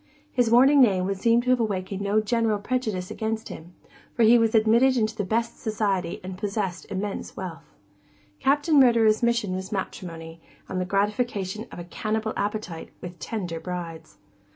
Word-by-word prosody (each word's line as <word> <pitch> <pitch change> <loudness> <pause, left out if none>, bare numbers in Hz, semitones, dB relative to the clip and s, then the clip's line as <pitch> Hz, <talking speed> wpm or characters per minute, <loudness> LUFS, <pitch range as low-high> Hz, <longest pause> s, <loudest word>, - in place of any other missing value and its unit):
His 245 -2 +2
warning 270 +5 +6
name 190 -7 +4
would 195 0 -2
seem 230 +3 +3
to 255 - +1
have 255 - +3
awakened 195 -3 -2
no 205 +2 +2
general 225 0 +1
prejudice 205 -5 -2
against 220 0 -3
him, 175 +2 -10 0.4
for 235 - +3
he 225 +2 +7
was 230 -1 +3
admitted 235 +4 +4
into 220 -1 0
the 210 - -2
best 230 +4 -1
society 200 -5 -1
and 185 0 -7
possessed 200 -4 -3
immense 200 +1 -4
wealth. 165 -4 -8 0.6
Captain 290 +2 +3
Murderer's 230 -4 +5
mission 235 -5 +1
was 190 +3 -5
matrimony, 165 -4 -6 0.3
and 185 -1 -3
the - - -1
gratification 205 +1 -1
of - - -9
a 175 - -6
cannibal 215 +5 -3
appetite 205 -5 -4
with 175 -1 -9
tender 175 -1 -4
brides. 165 -3 -7
210 Hz, 165 wpm, -25 LUFS, 185-230 Hz, 0.6 s, he